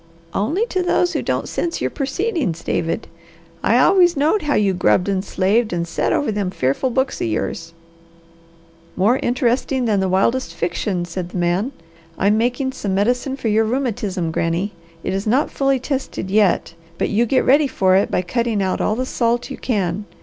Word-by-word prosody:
"Only 315 - 0
to 375 -6 -1
those 355 0 +1
who - - -1
don't - - -2
sense 340 -1 -2
your - - -1
purceedings, 275 - -2
David. 165 0 -2 0.5
I 235 - +3
always 350 +4 +5
knowed 315 +9 +2
how 295 -1 0
you 200 -2 +2
grubbed 180 +1 +2
and 195 -1 0
slaved 210 +4 +1
an' 170 -1 -1
set 170 - -1
over 285 - +1
them 205 -3 -1
fearful 140 - 0
books 265 +2 -1
o' - - +1
yours." 165 +9 -3 1.2
"More 220 +8 +3
interesting 250 +1 0
than 210 -3 +2
the 190 -1 0
wildest 190 0 +1
fiction," 175 +1 -2
said 175 +1 -5
the 185 - -6
man. 175 +8 0 0.5
"I'm 200 +2 +3
making 245 +4 0
some 200 -7 -3
medicine 245 +6 0
for 250 - -3
your 215 +1 +3
rheumatism, 215 -8 -2
Granny. 170 +5 -1 0.3
It - - -2
is 195 +2 -2
not 255 +7 +2
fully 275 -1 +1
tested 260 -8 -4
yet, 205 -5 +2 0.2
but - - 0
you 230 +3 +2
get 260 - +2
ready 285 +3 +5
for 190 -7 +2
it 195 - +3
by 180 - 0
cutting 230 +3 -1
out 190 -1 0
all 215 - +1
the 255 +2 -2
salt 240 +1 -1
you - - -5
can. 200 -4 -1
220 Hz, 185 wpm, -20 LUFS, 185-265 Hz, 1.2 s, always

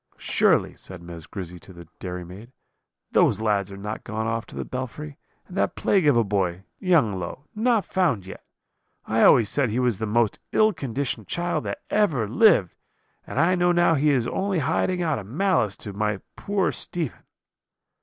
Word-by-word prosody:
"'Surely,' - - +2
said 95 -1 -10
Miss 85 -2 -10
Grizzy 90 -3 -7
to 95 - -14
the 85 -2 -12
dairy 90 -1 -5
maid, 100 +8 -11 0.6
'those 100 - +3
lads 100 -3 0
are 100 - -8
not 105 +2 -5
gone 110 +1 -3
off 115 +1 -2
to - - -12
the - - -4
belfry, 130 +4 -6 0.3
and 180 - -11
that - - 0
plague 190 -6 +2
of 140 -5 +5
a 115 - +4
boy, 95 -3 -1 0.2
young 150 - +2
Low, 90 +11 -6
not 225 -1 +2
found 165 - 0
yet! 95 - -10 0.6
I 110 +1 +1
always 115 -5 +6
said 135 +1 +1
he 110 - -2
was 125 -5 +1
the 110 - -2
most 115 0 +1
ill 215 0 +4
conditioned 135 - -3
child 175 - -2
that - - -5
ever 155 - +2
lived; 115 - +4 0.5
and - - -3
I 170 +4 +4
know 175 -1 +3
now 175 -1 +4
he 150 0 +2
is 130 -5 +2
only 195 -1 -1
hiding 165 +4 0
out 155 -6 0
of 100 - -9
malice 150 - +1
to 105 - -7
my 105 -1 -1
poor 200 -1 0
Stephen.' 165 -7 -4
120 Hz, 185 wpm, -24 LUFS, -, 0.6 s, always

